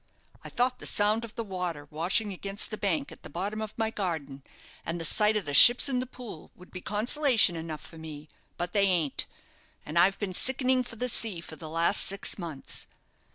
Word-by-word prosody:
I - - -8
thought 250 0 0
the - - -2
sound 210 +2 +2
of 230 - -9
the 230 - -3
water 180 -7 -4
washing 190 +7 +1
against 195 +4 -3
the 215 - -4
bank 175 -8 -1
at - - -12
the - - -10
bottom 200 +7 -3
of 215 -1 -6
my 225 -1 0
garden, 160 -10 -4 0.4
and 170 +1 -3
the 165 - -3
sight 210 +6 +3
of 205 - -3
the 145 - -4
ships 240 - +9
in 260 -2 0
the 255 - -3
Pool, 240 -10 -10
would 180 - -16
be 180 - -7
consolation 225 - +3
enough 160 -2 -6
for 165 - -11
me, 155 -1 -9 0.3
but 175 0 -3
they 200 -1 +4
ain't, 165 -7 0 0.6
and 155 +3 0
I've 195 +3 +4
been 200 -3 -3
sickening 260 +4 +1
for 245 -2 -7
the 250 +3 -2
sea 220 -6 -2
for 165 -1 -9
the 155 -1 -9
last 165 +5 +3
six 200 +1 -2
mouths. 160 -6 -4
195 Hz, 210 wpm, -28 LUFS, 165-220 Hz, 0.6 s, ships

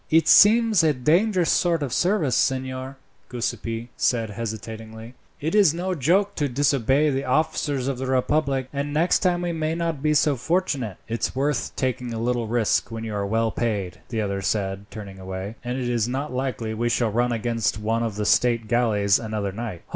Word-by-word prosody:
"It 160 +1 +4
seems 220 -1 +6
a 155 -2 +4
dangerous 175 - +2
sort 170 -3 +2
of 130 -4 -3
service, 175 - +1
signor," 130 0 -1 0.3
Giuseppi 120 -1 -4
said 115 -3 0
hesitatingly. 110 +1 -7 0.3
"It 160 +3 -2
is 200 -7 +5
no 185 +2 -2
joke 185 +7 +2
to 145 -2 0
disobey 140 +2 +2
the 135 0 -1
officers 140 -1 0
of 135 -2 -2
the 130 - -3
republic, 135 0 +1
and 145 +1 -3
next 170 +4 +3
time 180 -1 +1
we 175 - -1
may 160 -1 -2
not 165 -4 -2
be 150 0 +2
so 150 -1 +3
fortunate." 140 - -1
"It's 115 +2 -2
worth 135 -2 -1
taking 125 -2 -2
a - - -3
little 120 0 -1
risk 115 0 +1
when 115 -1 -6
you 110 -1 -5
are 100 -1 -2
well 115 +2 +1
paid," 105 -7 -2
the 115 -3 -2
other 100 -1 -2
said, 95 -1 -2
turning 100 -3 -9
away, 95 +2 -6
"and 125 +1 -3
it 125 -2 -2
is 120 -2 0
not 135 +3 -3
likely 125 -4 -3
we 120 +2 -1
shall 115 -2 +1
run 120 +3 +1
against 115 -2 -1
one 110 +2 -1
of 115 -3 -2
the 105 0 -2
state 115 +1 +2
galleys 105 -5 +2
another 110 -3 -3
night." 105 -4 -6
125 Hz, 190 wpm, -24 LUFS, 110-150 Hz, 0.3 s, seems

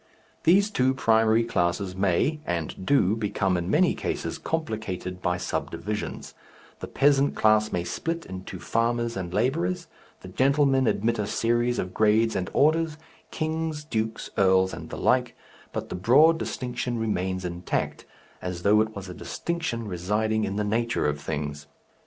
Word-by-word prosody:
These 200 +5 +5
two 130 -7 +2
primary 110 -1 +3
classes 90 -2 -1
may 100 - +1
and 85 +2 -4
do 110 -8 +3
become 100 -3 0
in 85 0 -2
many 180 - +4
cases 165 - -3
complicated 110 - -4
by 90 0 0
subdivisions; 105 +3 -4 0.5
the - - -6
peasant 140 0 +3
class 110 0 +3
may 90 - -1
split 165 - -3
into 95 +1 -7
farmers 115 +4 0
and 90 -2 -4
labourers, 165 - 0 0.4
the - - -10
gentlemen 135 +4 +2
admit 115 +2 +1
a 105 - -1
series 120 +2 +1
of 90 0 -3
grades 110 +1 +3
and 90 - -2
orders, 155 +1 +2 0.3
kings, 160 -1 -2
dukes, 110 -6 -3
earls, 95 -1 +4
and - - -8
the - - -6
like, - - +2 0.4
but - - -5
the - - -4
broad 150 - +5
distinction 125 -3 -3
remains 95 -4 -1
intact, 85 0 -3 0.4
as 90 -1 -5
though 105 +1 +5
it 110 0 -2
was 100 -1 -7
a 90 - -7
distinction 160 - -3
residing 105 +4 0
in 100 - -3
the 105 - 0
nature 115 +3 0
of 75 0 -1
things. 75 -1 -4
110 Hz, 150 wpm, -26 LUFS, 95-135 Hz, 0.5 s, These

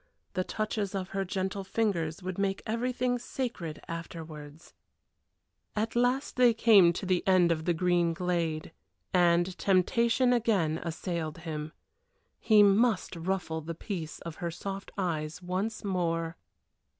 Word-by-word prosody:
The 185 -2 0
touches 215 -1 -2
of 190 -1 -3
her 195 0 -1
gentle 190 +1 -2
fingers 185 -5 -1
would 185 +1 -4
make 195 -1 0
everything 245 +2 0
sacred 235 - -4
afterwards. 160 -2 -8 1.0
At 220 +2 -1
last 250 +3 +1
they 245 -2 +5
came 205 -7 +7
to 190 - -5
the 185 -1 +2
end 185 -2 +5
of 160 -1 -1
the 175 - +2
green 175 -1 +2
glade 165 -3 -1 0.4
and 175 0 +3
temptation 235 +6 +3
again 195 -10 +1
assailed 165 -2 -3
him. 155 -2 -5 0.7
He 215 -2 +6
must 205 -1 +3
ruffle 170 -2 -2
the 165 +2 -6
peace 165 -3 -5
of 165 -2 -7
her 170 - -3
soft 195 +3 -6
eyes 160 -3 -2
once 195 +5 -2
more. 165 -4 -1
185 Hz, 135 wpm, -29 LUFS, 165-210 Hz, 1.0 s, came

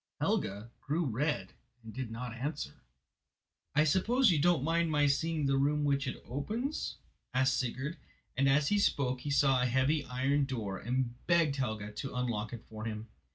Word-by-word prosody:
Helga 105 +4 -1
grew 160 +4 0
red 125 -5 -1 0.3
and 110 -1 -9
did 130 -3 -4
not 115 +1 -5
answer. 145 +5 -4 0.9
"I 150 - +6
suppose 220 - +4
you 160 - +2
don't 170 -4 +3
mind 165 +2 +2
my 150 -1 +3
seeing 155 +2 +1
the 135 0 +2
room 150 +2 +2
which 140 -1 +1
it 125 - -4
opens?" 220 - -3 0.4
asked 130 0 +3
Sigurd, 135 +5 -3 0.4
and 135 +1 +3
as 140 +2 +3
he 205 - +3
spoke 130 -9 +1
he 145 - -4
saw 135 -2 +4
a 125 - +2
heavy 135 +5 +2
iron 135 +3 +1
door 110 -8 -3
and 125 +1 -1
begged 165 -5 +3
Helga 110 -5 -2
to 130 +6 -6
unlock 115 -4 -1
it 120 -1 -8
for 110 0 -7
him. 110 0 -5
135 Hz, 175 wpm, -32 LUFS, 120-150 Hz, 0.9 s, I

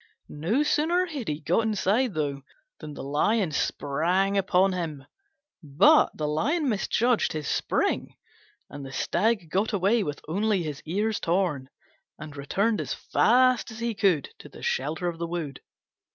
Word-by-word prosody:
No 185 - 0
sooner 330 +5 +2
had 295 -9 -6
he 150 0 -2
got 170 +8 +2
inside 220 +1 0
than 140 -3 -2 0.4
the 150 - -8
Lion 165 +7 +1
sprang 170 +8 0
upon 190 -1 +2
him, 155 -6 -4 0.6
but 145 -3 +5
he 155 - 0
misjudged 240 -2 +1
his 155 -2 -4
spring, - - -1 0.5
and 145 - -9
the 135 - -8
Stag 195 - 0
got 205 +4 0
away 205 +4 +2
with 145 -7 -4
only 200 +2 0
his 150 -3 -5
ears 210 +6 -1
torn, 165 -7 -1 0.5
and 150 -1 -9
returned 200 +11 0
as - - -4
fast 250 +2 +3
as 220 - -9
he 235 0 -2
could 190 -9 +1
to - - -12
the - - -13
shelter 155 +6 -1
of 170 -1 -4
the 170 - -2
wood. 165 -6 -5
185 Hz, 150 wpm, -26 LUFS, 150-220 Hz, 0.6 s, but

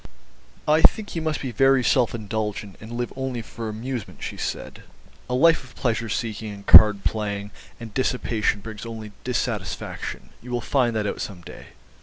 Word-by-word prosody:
"I 155 +1 +4
think 205 +4 +4
you 165 - -1
must 155 -1 -1
be 130 - -3
very 135 +2 +4
self 120 -1 +2
indulgent 105 -2 -4
and 110 +2 -9
live 120 0 -3
only 130 -3 -3
for 110 0 -6
amusement," 115 +1 -5
she - - -4
said, - - -5 0.5
"a 125 - 0
life 165 +3 +5
of 125 - -16
pleasure 115 -2 -1
seeking 110 0 -3
and 100 -1 -10
card 105 -2 +9
playing 105 -2 -2 0.3
and 115 -2 -9
dissipation 115 -5 0
brings 110 0 -8
only 110 -2 -7
dissatisfaction. 125 -1 -3
You 125 - -11
will 120 0 -1
find 120 -1 +1
that 105 -1 0
out 100 - -3
some 95 -4 -6
day." 85 - -11
115 Hz, 175 wpm, -24 LUFS, 105-130 Hz, 0.5 s, card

